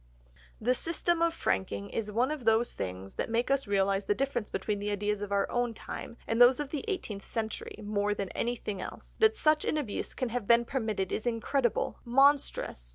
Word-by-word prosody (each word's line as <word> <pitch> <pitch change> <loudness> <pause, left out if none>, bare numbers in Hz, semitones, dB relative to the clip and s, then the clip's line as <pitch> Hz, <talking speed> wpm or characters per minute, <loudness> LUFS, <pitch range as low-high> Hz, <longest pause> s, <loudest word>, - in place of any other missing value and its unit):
The 245 +3 +2
system 335 +4 0
of 335 0 +4
franking 100 - -2
is 210 -2 -2
one 245 +6 +1
of 305 -4 -4
those 225 +1 +3
things 95 +1 -6
that - - -2
make 235 +3 0
us 275 -3 +1
realise 195 0 +1
the 205 - +1
difference 255 -4 -1
between 205 +2 -2
the 205 +1 -2
ideas 205 0 -1
of 205 -1 -4
our 200 0 +2
own 245 -1 0
time 235 - -7
and 225 +1 +1
those 245 +2 +8
of 290 -2 -3
the 300 - -3
eighteenth 225 - -3
century 220 -1 -4
more 205 0 0
than 195 -2 -3
anything 215 -5 -3
else; - - -9
that 440 0 +5
such 305 -1 +3
an - - 0
abuse 245 -9 -3
can 255 -3 -1
have 235 -3 -3
been 235 0 +5
permitted 220 -8 -2
is 220 - -2
incredible, 240 +1 0
monstrous. 270 - +2
230 Hz, 200 wpm, -30 LUFS, 205-265 Hz, -, those